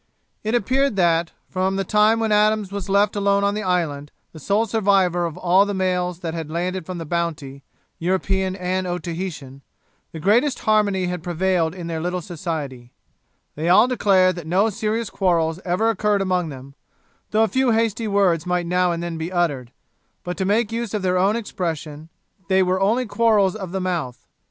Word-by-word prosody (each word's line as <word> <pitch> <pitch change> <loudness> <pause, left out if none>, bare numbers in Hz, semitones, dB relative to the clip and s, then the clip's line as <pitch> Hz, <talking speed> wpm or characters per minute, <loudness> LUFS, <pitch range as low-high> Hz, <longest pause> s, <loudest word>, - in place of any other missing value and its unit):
It 220 +2 0
appeared 260 +2 +1
that, 170 -2 +2 0.2
from 190 +1 -1
the 195 - 0
time 215 +3 +3
when 225 -1 0
Adams 210 -1 +2
was 200 -2 -5
left 205 +2 +2
alone 200 0 +2
on 200 0 +2
the 210 - -3
island, 165 -7 -1 0.2
the 160 - -10
sole 205 +8 +1
survivor 195 -5 +2
of 160 - -8
all 185 +2 +4
the 205 0 -3
males 180 -2 -1
that 165 -3 -4
had 165 -2 -5
landed 180 +1 -3
from 185 -1 -5
the 165 - -6
Bounty, 155 -5 -3 0.4
European 190 +2 0
and 185 0 -2
Otaheitan, 170 -6 -5 0.5
the 160 - -7
greatest 235 - +2
harmony 205 -3 +2
had 180 -1 -3
prevailed 175 -1 0
in 175 -2 -7
their 165 -1 -3
little 180 +2 -2
society; 150 -8 -6 0.6
they 160 +3 -2
all 190 +7 +6
declared 190 -7 +3
that 165 -2 -7
no 195 +6 +2
serious 220 +1 -2
quarrels 170 -3 +1
ever 190 +6 +1
occurred 210 -1 +1
among 180 -3 0
them, 135 -1 -10 0.6
though 220 +1 +3
a - - +3
few 260 +2 +1
hasty 225 0 +1
words 190 -5 +2
might 180 -1 0
now 180 +1 +1
and 170 0 -3
then 170 -1 -4
be 165 +3 -4
uttered, 145 -9 -1 0.5
but, 180 0 -4
to 190 - -2
make 210 +3 +1
use 230 -2 -3
of 205 - -2
their 180 -1 +1
own 195 +4 +2
expression, 160 -8 -5 0.4
they 190 +1 +3
were 185 +1 0
only 230 +6 +2
quarrels 215 -4 +2
of 190 -5 -6
the 190 - -2
mouth. 170 -9 -3
185 Hz, 185 wpm, -22 LUFS, 170-205 Hz, 0.6 s, all